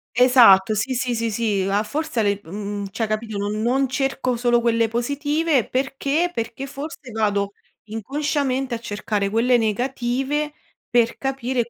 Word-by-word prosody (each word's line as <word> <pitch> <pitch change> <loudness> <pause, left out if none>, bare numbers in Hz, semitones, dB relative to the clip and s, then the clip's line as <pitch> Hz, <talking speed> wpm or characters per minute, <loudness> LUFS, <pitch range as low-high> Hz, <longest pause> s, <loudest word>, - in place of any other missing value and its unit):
Esatto, 235 -6 +6
sì, 235 +5 -1
sì, 250 0 -1
sì, 230 0 -1
sì. 215 -2 0
A 200 +2 +1
forse 300 +4 -3
a - - +1
le 200 -1 +1
mhmm, 200 +3 -5
cioè, 225 - -1
capito, 215 0 -3
non 205 +1 -2
non 260 +4 +2
cerco 260 -1 -1
solo 240 0 +2
quelle 230 -1 +2
positive, 285 +4 0
perché, 275 +6 0
perché 230 +3 -4
forse 280 -1 -8
vado 205 -2 0 0.4
inconsciamente, 270 +3 -1
a - - -5
cercare 205 -2 -2
quelle 235 +4 +3
negative 260 +6 -1 0.4
per 235 -1 +2
capire 260 -3 -2
240 Hz, 150 wpm, -22 LUFS, 215-270 Hz, 0.4 s, Esatto